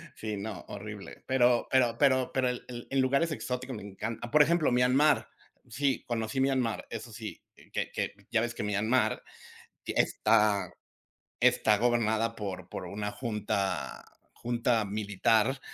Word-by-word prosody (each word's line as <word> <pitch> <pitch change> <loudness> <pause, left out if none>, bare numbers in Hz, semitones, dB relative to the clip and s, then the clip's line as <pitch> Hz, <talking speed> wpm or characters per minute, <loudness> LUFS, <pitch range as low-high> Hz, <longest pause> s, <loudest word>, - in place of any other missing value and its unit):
sí, 105 -2 -4
no, 100 -3 -6
horrible. 105 -1 -8
Pero 125 -2 +3
pero 120 -3 +3
pero 130 -1 +3
pero 130 -1 +2
el 125 - -5
el 120 -1 -8
en 135 -1 +3
lugares 140 +5 +2
exóticos 130 -2 -4
me 105 - -7
encan 105 +3 -5
Por 150 - +6
ejemplo, 170 -3 +2
Myanmar. 125 +5 +3 0.4
Sí, 135 +3 0
conocí 115 +1 -2
Myanmar, 130 -6 0
eso - - -7
sí, - - -7 0.3
que - - -2
que - - -2 0.2
ya 115 - +3
ves 120 0 -2
que 120 - -5
Myanmar 110 +3 +1 0.6
está 105 -2 +2 0.7
está 105 -1 +4
gobernada 115 -1 +1
por 100 -3 -5
por 95 - -6
una 105 +3 -4
junta 105 - -2 0.3
junta 120 -1 0
militar 105 +5 +1
115 Hz, 140 wpm, -29 LUFS, 105-130 Hz, 0.7 s, Por